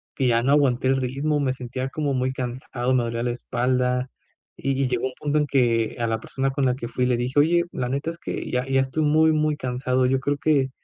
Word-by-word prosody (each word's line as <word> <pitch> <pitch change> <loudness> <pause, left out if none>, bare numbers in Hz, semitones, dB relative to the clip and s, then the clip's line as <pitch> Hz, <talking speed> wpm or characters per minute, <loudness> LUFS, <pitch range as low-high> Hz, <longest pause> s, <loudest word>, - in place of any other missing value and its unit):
que 130 -3 +1
ya 120 0 +3
no 135 - +2
aguanté 135 -3 +3
el 135 - +3
ritmo. 140 +4 -1
Me 130 -2 0
sentía 130 +1 -5
como 145 0 -2
muy 130 0 0
cansado. 125 0 -3
Me 125 -2 +3
dolía 115 0 -2
la 120 - 0
espalda. 125 +1 0 0.5
Y 135 -1 -2
y - - +1
llegó 125 0 -1
un 130 - -8
punto 150 0 0
en 150 - 0
que 120 -5 +1
a 115 - 0
la 110 -1 -1
persona 135 0 -2
con 135 0 0
la 125 - +2
que 120 -2 -6
fui 125 +1 -1
le 125 -1 +2
dije: 125 +4 0
"Oye, 170 +4 +4
la 125 - -3
neta 140 +5 -2
es 170 - -11
que - - -5
ya 125 +1 0
ya 135 0 +3
estoy 135 +4 -1
muy, 155 +2 +4
muy 155 -1 +1
cansado. 125 -1 0
Yo 130 +1 +2
creo 145 +2 -1
que 140 -3 +2
130 Hz, 250 wpm, -24 LUFS, 125-140 Hz, 0.5 s, Oye